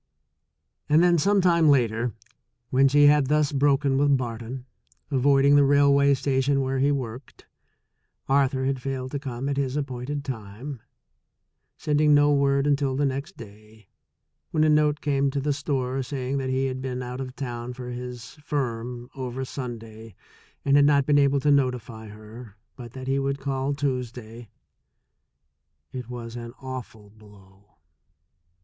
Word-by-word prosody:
And 155 +3 +5
then 175 -1 +4
sometime 180 -3 +3
later 120 -3 +1 0.6
when 135 +1 +4
she 145 +2 +5
had 145 -2 +5
thus 150 0 +2
broken 140 -1 +2
with 140 -1 +3
Barton, 120 +1 -6 0.5
avoiding 140 +1 +4
the 145 - +6
railway 140 0 +4
station 135 +1 +1
where 135 0 -1
he 140 +2 +3
worked, 130 -2 -6 0.8
Arthur 135 -1 +2
had 135 -1 -1
failed 130 -1 -4
to 140 - -3
come 135 -1 -5
at 140 -1 -2
his 135 -1 -1
appointed 140 +1 -4
time, 120 +1 -7 1.0
sending 150 0 +3
no 145 0 +4
word 140 0 +2
until 140 -2 +1
the 145 +2 +1
next 140 +7 -4
day, 110 -1 -14 0.6
when 155 - +1
a 155 - +4
note 150 0 +2
came 140 -1 +1
to 140 +1 -2
the 145 +1 0
store 135 -2 -2
saying 135 0 -3
that 130 -1 -3
he 130 +1 0
had 130 -1 -3
been 130 -1 -4
out 125 +1 -6
of 130 -1 -7
town 120 -2 -5
for 125 0 -7
his 125 -1 -7
firm 120 -4 -3
over 130 0 -5
Sunday 115 -5 -8 0.5
and 140 0 +4
had 145 - +6
not 140 -2 +3
been 145 0 +4
able 140 0 +3
to 145 +2 +2
notify 125 -5 -1
her, 110 +1 -12 0.2
but 120 -3 -10
that 130 -1 -8
he 135 +1 0
would 140 0 -1
call 135 0 -2
Tuesday. 120 -5 -4 1.4
It 125 -2 -7
was 120 -1 -7
an 120 0 -8
awful 125 -6 -8
blow. 100 -2 -20
135 Hz, 155 wpm, -25 LUFS, 120-140 Hz, 1.4 s, the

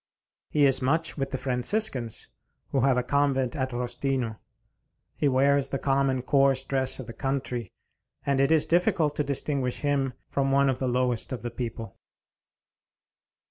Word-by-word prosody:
He 145 -2 +3
is 135 -1 +5
much 155 +5 0
with 135 -2 -3
the 130 - -3
Franciscans, 125 - +1 0.4
who 135 - 0
have 130 0 +3
a 125 - +1
convent 135 -1 +1
at 130 -3 -1
Rostino. 125 -1 -2 0.8
He 145 - +1
wears 140 +1 +3
the 135 - -2
common 135 -2 0
coarse 135 -1 +3
dress 130 -1 0
of - - -6
the 115 - -9
country, 130 -6 -3 0.6
and 140 -2 +1
it 135 +2 +3
is 160 -2 +4
difficult 165 -3 +1
to 150 - +1
distinguish 140 -2 -2
him 140 -3 0
from 135 -1 0
one 140 0 +3
of 130 - -5
the 130 - -1
lowest 125 -1 0
of 125 - -5
the 120 - -4
people. 115 -3 -6
135 Hz, 160 wpm, -26 LUFS, 125-140 Hz, 0.8 s, is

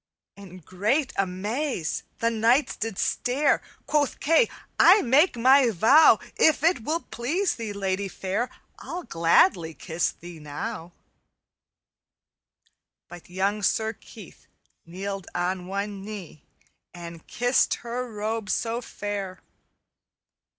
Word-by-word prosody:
"In 195 -2 -12
great 210 - -1
amaze 195 - -2 0.2
the 230 0 0
knights 235 +6 +2
did 225 -3 -4
stare. 260 +8 +1 0.2
Quoth 295 -2 0
Kay, 330 - +3 0.3
'I 390 +4 +7
make 270 +4 +3
my 260 +2 +5
vow 230 - +6 0.2
If 315 -2 +3
it 330 -8 +2
will 325 +6 -1
please 330 +12 -1
thee, 225 -3 -5
lady 195 0 -2
fair, 195 +6 -3 0.3
I'll 355 +1 -6
gladly 165 - +2
kiss 165 -1 -1
thee 175 -1 -12
now_.' 165 +5 -6 2.2
"_But 175 0 -12
young 195 +3 -1
Sir 220 +2 0
Keith 215 -3 -15 0.4
kneeled 195 +2 -6
on 180 +1 -2
one 200 0 -4
knee 195 -7 -9 0.5
And 170 -1 -10
kissed 245 +1 +1
her 245 +1 -4
robes 215 0 -3
so 230 +1 -2
fair. 200 -4 -5
210 Hz, 115 wpm, -25 LUFS, 185-245 Hz, 2.2 s, I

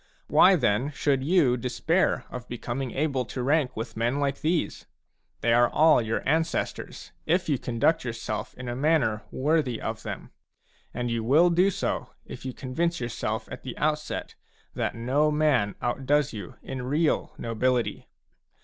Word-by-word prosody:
Why 190 - +6
then 125 - +1
should 140 -2 0
you 145 -6 +3
despair 125 +3 0
of 125 -1 -7
becoming 125 +2 -4
able 135 0 0
to 125 +2 -5
rank 140 -2 +1
with 115 +1 -5
men 120 +5 0
like 140 -1 -1
these? 165 +1 -1 0.5
They 115 0 +3
are 120 0 +5
all 155 -4 +5
your 115 +2 -2
ancestors, 160 +3 -1 0.2
if 175 +2 +2
you 145 -5 +1
conduct 125 +7 +1
yourself 115 -3 -4
in 130 0 -8
a 120 - -3
manner 135 -7 +2
worthy 140 -4 0
of 110 0 -4
them; - - -7 0.6
and 120 0 -3
you 115 -1 -1
will 155 +9 +5
do 180 +3 +4
so 195 - -2 0.2
if - - -9
you 130 - -2
convince 155 +7 -2
yourself 110 -2 -3
at - - -7
the 130 - -7
outset 150 0 -2 0.4
that - - -2
no 130 +6 +2
man 150 -9 +2
outdoes 140 +3 +1
you 100 -5 -7
in 130 -1 -5
real 150 +5 0
nobility. 115 -1 -1
130 Hz, 160 wpm, -27 LUFS, 120-155 Hz, 0.6 s, Why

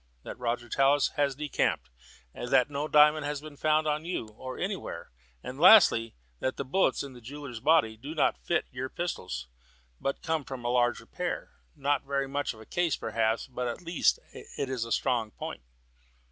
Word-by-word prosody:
That - - -8
Roger 120 0 -2
Tallis 135 +3 +3
has 140 -2 0
decamped, 135 - -1 0.4
that 125 +2 +2
no 145 +2 -2
diamond 150 0 +5
has 145 -1 -2
been 150 0 -10
found 155 +1 +2
on 150 0 0
you 165 -10 -4
(or 130 +4 -8
anywhere), 195 -1 -4 0.3
and 130 +2 -7
lastly 170 - +7 0.2
that 130 - -2
the 140 - -3
bullets 135 -1 +1
in 140 -2 -8
the 120 - -13
jeweller's 135 -1 -8
body 140 -5 +3
do 145 +8 -8
not 150 - +1
fit 170 - 0
your 130 0 -4
pistols, 90 - -4 0.5
but 135 - -3
came 160 -2 0
from 130 -3 -7
a - - +1
larger 120 -1 +1
pair. - - -4 0.2
Not 140 0 0
very 140 0 -1
much 145 +1 -2
of - - -15
a 110 - -12
case, 175 +2 0
perhaps, 110 0 0
but 125 -2 -4
this 170 -1 +2
last - - -11
is 130 -4 -2
a 115 - -9
strong 120 -4 +1
point." - - -7
135 Hz, 180 wpm, -29 LUFS, 120-150 Hz, 0.5 s, lastly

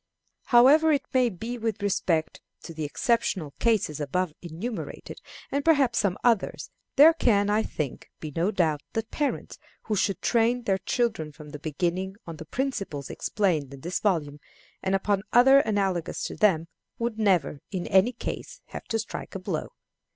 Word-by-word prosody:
However 285 +6 +6
it 280 -2 +1
may 255 -2 +4
be 230 +5 -6
with 220 -2 -2
respect 170 -5 0 0.2
to 165 - -8
the 155 -1 -4
exceptional 180 - 0
cases 215 -10 +1
above 155 +3 -1
enumerated, 180 +8 -6 0.3
and 280 +1 0
perhaps 280 -7 +3
some 195 -2 +1
others, 230 -6 +1 0.2
there 305 +4 +8
can, 205 -9 +2
I 215 +1 +3
think, 150 - -5
be 155 -2 -7
no 170 +4 +1
doubt 160 -8 +1
that 225 0 -3
parents 290 -2 -3 0.2
who 215 - -1
should 195 0 0
train 240 +1 +2
their 195 -5 +1
children 220 -12 -1
from 150 0 -12
the 150 - -7
beginning 175 +5 -2
on 165 -2 -8
the 160 - -9
principles 195 - -3
explained 165 -10 -1
in 135 - -14
this 175 +4 -2
volume, 155 -8 0 0.4
and 190 0 +1
upon 195 0 +1
others 265 +3 +7
analogous 195 -5 -1
to - - -4
them, 170 -6 +2 0.3
would 230 -1 -3
never, 180 -9 +2
in 185 -4 -4
any 195 +6 +4
case, 245 - -6
have - - -8
to 225 - -1
strike - - -6
a - - -3
blow. - - -3
200 Hz, 165 wpm, -26 LUFS, 165-235 Hz, 0.4 s, there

